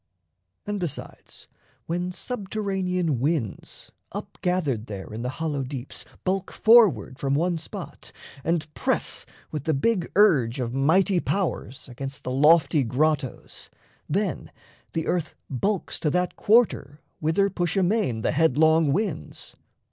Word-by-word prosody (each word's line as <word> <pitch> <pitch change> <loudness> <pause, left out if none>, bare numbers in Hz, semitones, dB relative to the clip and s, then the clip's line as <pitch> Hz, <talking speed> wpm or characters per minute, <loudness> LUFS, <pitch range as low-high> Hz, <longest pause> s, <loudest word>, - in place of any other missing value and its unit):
And 205 0 -2
besides, 175 -6 -7 0.4
When 175 +2 -2
subterranean 190 - -2
winds, 135 - -3 0.2
up - - -7
gathered 145 -11 0
there 100 0 -7
In 110 - -5
the 125 - -2
hollow 155 -4 -1
deeps, 130 -1 -6 0.2
bulk 190 0 -1
forward 200 - +5
from 135 0 0
one 170 +2 +1
spot, 160 - -9 0.3
And 155 -1 -1
press - - -1 0.2
with 150 -3 -4
the 160 -2 +2
big 185 +4 0
urge 140 - +4
of 120 -1 -2
mighty 175 +7 +3
powers 175 -9 -2
Against 135 +3 -7
the 125 - -3
lofty 150 +2 +4
grottos, 135 +2 -1 0.4
then 190 +2 -1 0.4
the 160 -1 -1
earth 170 -3 -1 0.2
Bulks 195 - -1
to 155 - +1
that 180 +3 0
quarter 205 - +2 0.2
whither 180 +6 +2
push 175 +1 -1
amain 185 - +1
The - - +2
headlong 160 0 +4
winds. 180 - -3
160 Hz, 130 wpm, -25 LUFS, 135-185 Hz, 0.4 s, forward